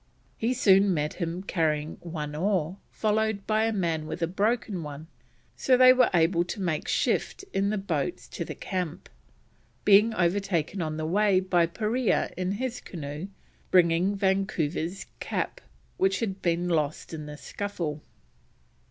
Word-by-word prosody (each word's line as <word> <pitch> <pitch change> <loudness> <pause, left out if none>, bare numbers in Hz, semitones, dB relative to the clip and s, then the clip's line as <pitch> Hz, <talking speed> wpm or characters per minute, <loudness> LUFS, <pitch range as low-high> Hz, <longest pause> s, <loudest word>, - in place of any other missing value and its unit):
He 240 +3 0
soon 195 -4 +5
met 150 0 -1
him 170 +2 -2
carrying 155 -4 -1
one 155 -3 -5
oar, 180 0 0
followed 215 -1 0
by 220 0 +2
a 225 - +1
man 165 -6 -1
with 165 - -4
a - - +5
broken 205 0 0
one, 150 0 -7 0.5
so 255 -1 +3
they 255 0 +8
were 255 -1 +4
able 170 0 +3
to 175 - -6
make 170 -5 -1
shift 390 - 0
in 195 +1 +1
the 215 - 0
boats 180 -2 -2
to - - -4
the - - -7
camp, 180 -2 -4 0.8
being 210 +3 +6
overtaken 185 -1 0
on 155 -1 -2
the 155 - -2
way 195 +3 +3
by 180 -2 +2
Parea 220 +6 0
in 185 +1 -1
his 250 +3 -3
canoe 150 +1 -6 0.4
bringing 180 +2 +4
Vancouver's 190 -3 -1
cap, - - -3 0.4
which 190 0 +2
had 195 -4 -3
been 175 0 0
lost 155 -2 -1
in 155 -2 -6
the 150 0 -8
scuffle. 170 -6 -4
185 Hz, 150 wpm, -27 LUFS, 165-205 Hz, 0.8 s, they